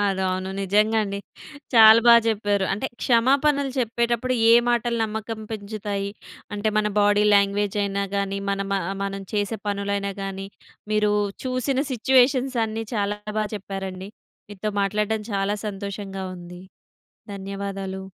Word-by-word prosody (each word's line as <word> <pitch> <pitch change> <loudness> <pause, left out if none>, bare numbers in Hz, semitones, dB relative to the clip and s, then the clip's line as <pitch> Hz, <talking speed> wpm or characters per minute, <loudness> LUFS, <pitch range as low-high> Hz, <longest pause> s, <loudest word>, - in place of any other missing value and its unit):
ఆ! - - +2 0.3
అవును 185 +1 -2
నిజంగా 210 +3 +2
అండి. 200 0 -4 0.6
చాలా 220 0 +9
బాగా 235 0 +9
చెప్పారు. 205 -2 +1
అంటే, 210 +7 -2 0.2
క్షమ‌పనలు 275 +3 +3
చెప్పేటప్పుడు 235 +1 0 0.2
ఏ - - +8
మాటలు 240 0 +1
నమ్మకం 220 +1 -5
పెంచుతాయి, 205 -2 -4 0.4
అంటే 205 +1 -1
మన 210 - +1
బాడీ 205 0 +4
లాంగ్వేజయినా 200 0 +1
గాని, 200 0 -1
మనం 195 0 -2 0.3
మ - - 0 0.3
చేసే 205 +2 -1
పనులైనా 200 0 -2
గాని, 195 0 -5 0.5
మీరు 210 0 +2 0.3
చూసిన 255 +1 0
సిట్యుయేషన్సన్నీ 250 -3 +2
చాలా 205 -1 -1 0.2
బాగా 215 - +1
చెప్పారండి. 195 -1 -6 0.4
మీతో 205 +1 -4
మాట్లాడటం 210 +2 0
చాలా 200 +1 0
సంతోషంగా 195 -1 -6
ఉంది. 175 +1 -11 0.7
ధన్యవాదాలు. 195 -1 -5
205 Hz, 120 wpm, -24 LUFS, 195-225 Hz, 0.7 s, చాలా